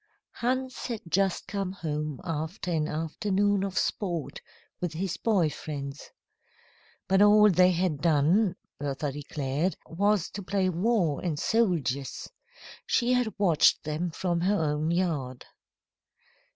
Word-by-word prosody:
Hans 255 +1 -2
had 235 -4 -4
just 195 +2 +1
come 195 -1 -3
home 150 -5 -4
after 165 +2 -4
an 155 -2 0
afternoon 195 +6 0
of 195 -1 -3
sport 175 -7 -2 0.4
with 175 -3 -3
his 180 +2 -2
boy 200 -8 +2
friends. 140 -2 -7 1.0
But 190 +1 +3
all 210 0 +7
they 180 0 +5
had 175 -5 0
done, 170 +5 +3 0.2
Bertha 145 0 -2
declared, 145 +4 -2
was 200 +3 +1
to 200 - -6
play 195 -1 0
war 180 -4 +1
and 165 -5 -1
soldiers. 150 - 0 0.6
She 245 0 +2
had 250 -3 +1
watched 180 -7 +4
them 155 +3 -2
from 170 +1 -1
her 195 +4 +2
own 155 0 0
yard. 160 -8 -1
175 Hz, 125 wpm, -28 LUFS, 150-200 Hz, 1.0 s, all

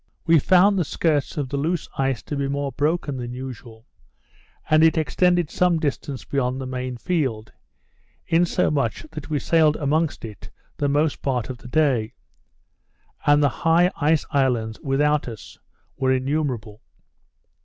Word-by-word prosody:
We 165 -2 +5
found 190 +6 +4
the - - +2
skirts 150 -2 -1
of 140 -3 -2
the 140 - -2
loose 160 +4 -1
ice 135 -2 -1
to 150 - -5
be 140 -1 -1
more 140 0 -2
broken 150 -1 -1
than 120 0 -5
usual; 120 -3 -9 0.8
and 155 +1 +4
it 160 0 +4
extended 175 +1 +2
some 180 -2 +2
distance 145 -3 -3
beyond 130 -1 -1
the 130 - -4
main 130 -1 -4
field, 125 -8 -2 0.7
insomuch 150 -7 +1
that 155 -2 -8
we 150 - 0
sailed 155 0 +3
amongst 155 -1 -1
it 105 -3 -10 0.3
the 145 - 0
most 145 +2 +1
part 130 -3 -1
of 125 - -10
the - - -12
day; 130 -6 +1 1.1
and 145 0 +5
the 145 - +4
high 170 +2 +4
ice 155 0 +1
islands 120 -5 0
without 145 +1 +1
us 115 -3 -10 0.4
were 130 -1 +1
innumerable. 130 -5 -2
145 Hz, 150 wpm, -23 LUFS, 130-155 Hz, 1.1 s, We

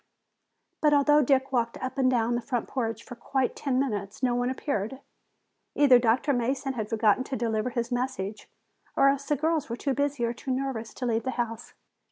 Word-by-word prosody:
But 300 -1 +4
although 295 +1 +5
Dick 270 0 +2
walked 235 -3 0
up 255 0 -5
and 265 -2 +3
down 240 -2 +1
the 240 - 0
front 240 -1 -2
porch 225 -3 -3
for 250 - -9
quite 265 +1 -1
ten 270 -3 -1
minutes, 210 -4 -3
no 250 -1 +3
one 245 +1 0
appeared. 260 -2 -3 0.8
Either 275 -4 +6
Dr. 245 +5 +2
Mason 265 +2 -1
had 220 -4 -4
forgotten 220 +1 +2
to 265 - -4
deliver 225 0 -1
his 235 0 -3
message 245 -5 -3 0.5
or 275 - +5
else 275 0 -1
the 295 - +1
girls 315 0 0
were 235 - -3
too 275 +1 -1
busy 285 -2 0
or 235 - -1
too 265 - -9
nervous 255 -4 -3
to 255 - -4
leave 230 -1 +1
the 260 - -3
house. 235 -1 -4
250 Hz, 200 wpm, -27 LUFS, 230-270 Hz, 0.8 s, Either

